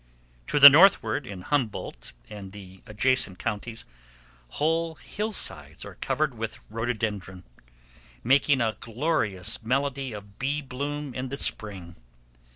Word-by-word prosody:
To -, -, -1 dB
the 140 Hz, -, +13 dB
northward, 150 Hz, -3 st, +5 dB
in 95 Hz, -4 st, -8 dB
Humboldt 115 Hz, -, -3 dB, 0.2 s
and 100 Hz, -2 st, -10 dB
the 95 Hz, -2 st, -12 dB
adjacent 105 Hz, -3 st, +1 dB
counties, 115 Hz, +1 st, -5 dB, 0.7 s
whole 165 Hz, +1 st, 0 dB
hillsides 120 Hz, -, -4 dB
are -, -, -9 dB
covered 150 Hz, -2 st, -1 dB
with 115 Hz, 0 st, -5 dB
rhododendron, 110 Hz, -5 st, -3 dB, 0.8 s
making 135 Hz, +1 st, +3 dB
a 110 Hz, -2 st, -1 dB
glorious 115 Hz, -, -1 dB
melody 135 Hz, +2 st, -1 dB
of 100 Hz, -1 st, -11 dB
bee 145 Hz, +3 st, -1 dB
bloom 145 Hz, +1 st, -5 dB
in 130 Hz, +1 st, -4 dB
the 140 Hz, -, -5 dB
spring. 95 Hz, -10 st, -1 dB
120 Hz, 120 wpm, -26 LUFS, 105-140 Hz, 0.8 s, the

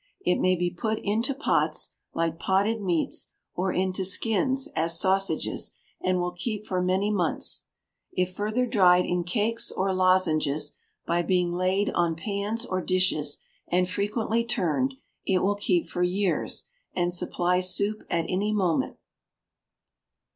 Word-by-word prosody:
It 385 Hz, -, +1 dB
may 185 Hz, 0 st, +3 dB
be 175 Hz, 0 st, -1 dB
put 220 Hz, +5 st, -2 dB
into 225 Hz, +6 st, 0 dB
pots, 290 Hz, -, 0 dB, 0.2 s
like 165 Hz, 0 st, -1 dB
potted 205 Hz, +5 st, +1 dB
meats, 175 Hz, -5 st, 0 dB, 0.3 s
or 185 Hz, +1 st, 0 dB
into 185 Hz, +1 st, 0 dB
skins, 225 Hz, +7 st, +1 dB
as 165 Hz, +1 st, +2 dB
sausages, 195 Hz, +1 st, +1 dB, 0.3 s
and 185 Hz, 0 st, +2 dB
will 180 Hz, 0 st, -1 dB
keep 210 Hz, +4 st, -4 dB
for 185 Hz, -3 st, -1 dB
many 190 Hz, +3 st, +1 dB
months. 180 Hz, -6 st, 0 dB, 0.5 s
If 185 Hz, 0 st, -1 dB
further 215 Hz, +6 st, 0 dB
dried 180 Hz, -7 st, +5 dB
in 175 Hz, 0 st, 0 dB
cakes 225 Hz, +5 st, 0 dB
or 190 Hz, 0 st, 0 dB
lozenges, 155 Hz, -6 st, +2 dB, 0.3 s
by 170 Hz, +1 st, +1 dB
being 175 Hz, 0 st, +1 dB
laid 185 Hz, +3 st, +1 dB
on 170 Hz, -2 st, +1 dB
pans 205 Hz, +6 st, -3 dB
or 185 Hz, -5 st, -2 dB
dishes, 185 Hz, -6 st, +1 dB, 0.3 s
and 180 Hz, +1 st, +2 dB
frequently 215 Hz, +4 st, 0 dB
turned, 240 Hz, -, 0 dB, 0.3 s
it 185 Hz, -2 st, +2 dB
will 200 Hz, +2 st, +3 dB
keep 190 Hz, -4 st, 0 dB
for 180 Hz, -, -4 dB
years, 185 Hz, +1 st, 0 dB, 0.3 s
and 175 Hz, -1 st, +1 dB
supply 180 Hz, 0 st, +1 dB
soup 200 Hz, +3 st, +1 dB
at 165 Hz, -1 st, 0 dB
any 200 Hz, +3 st, 0 dB
moment. 185 Hz, -6 st, 0 dB
185 Hz, 140 wpm, -27 LUFS, 175-210 Hz, 0.5 s, dried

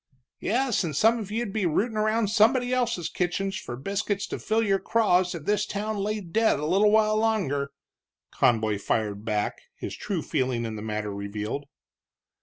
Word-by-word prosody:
"Yes, 245 Hz, 0 st, +1 dB
and 155 Hz, -4 st, -3 dB
some 225 Hz, +9 st, +4 dB
of 205 Hz, -3 st, -6 dB
you'd 220 Hz, -1 st, -2 dB
be 210 Hz, -5 st, +1 dB
rootin' 215 Hz, +8 st, 0 dB
around 215 Hz, 0 st, +1 dB
somebody 245 Hz, +3 st, +4 dB
else's 235 Hz, -9 st, 0 dB
kitchen 180 Hz, +3 st, -1 dB
for 190 Hz, -11 st, -6 dB
biscuits 200 Hz, -, -2 dB
to -, -, -4 dB
fill 220 Hz, +1 st, +1 dB
your 195 Hz, -2 st, +2 dB
craws 185 Hz, -6 st, +2 dB
if 155 Hz, -3 st, -7 dB
this 210 Hz, 0 st, +1 dB
town 210 Hz, +1 st, -3 dB
laid 205 Hz, -3 st, -3 dB
dead 225 Hz, -8 st, +3 dB
a 150 Hz, -, -2 dB
little 195 Hz, +6 st, +4 dB
while 215 Hz, 0 st, +4 dB
longer," 190 Hz, -11 st, 0 dB, 0.6 s
Conboy 110 Hz, -4 st, +2 dB
fired 105 Hz, 0 st, -1 dB
back, 105 Hz, -2 st, -1 dB
his -, -, -6 dB
true -, -, -3 dB
feeling 125 Hz, -3 st, -1 dB
in 110 Hz, -1 st, -4 dB
the 105 Hz, -, -6 dB
matter 105 Hz, -1 st, -3 dB
revealed. 105 Hz, +7 st, -4 dB
195 Hz, 175 wpm, -26 LUFS, 130-215 Hz, 0.6 s, some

